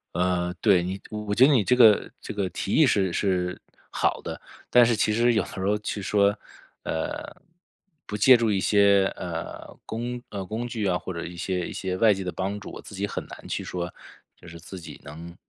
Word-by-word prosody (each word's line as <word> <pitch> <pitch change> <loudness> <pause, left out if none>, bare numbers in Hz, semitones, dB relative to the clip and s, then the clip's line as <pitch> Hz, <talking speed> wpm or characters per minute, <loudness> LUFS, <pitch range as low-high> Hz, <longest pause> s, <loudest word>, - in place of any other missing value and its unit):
呃， 90 0 0
对， 95 -5 +4
你 95 +2 -4
我 105 -1 -4
觉 125 +5 +6
得 - - +4
你 125 -7 +4
这 125 - +3
个 110 -4 +6
这 - - -7
个 100 -2 0
提 100 - -4
议 160 - +6
是 95 -8 +2
是 90 -2 -1 0.3
好 - - 0
的， - - -6 0.3
但 125 -1 +7
是 115 0 +2
其 105 0 +1
实 120 +2 +3
有 110 - +3
的 - - -7
时 - - -8
候 100 +2 +1
去 105 -1 -4
说， 100 +1 +2 0.5
呃， 80 - -4 0.7
不 105 - -5
借 125 +4 +7
助 115 -2 +1
一 100 - +1
些， 100 -1 +4
呃， 85 -1 -6
工 120 +2 -4
呃， 100 -2 -5
工 110 +5 -4
具 115 -3 -3
啊， 90 -2 +2
或 - - -6
者 85 - -5
一 85 - -8
些 90 0 -2
一 - - -7
些 95 -1 -3
外 110 +1 +5
界 95 -1 -4
的 90 - -3
帮 100 +2 -3
助， 100 - -9
我 - - -9
自 - - -12
己 100 +1 -2
很 - - -5
难 - - -11
去 - - -3
说 90 0 -4 0.5
就 - - -15
是 85 0 -10
自 85 +3 -9
己 85 - -11
能 85 +4 -10
100 Hz, 240 characters per minute, -25 LUFS, 90-110 Hz, 0.7 s, 但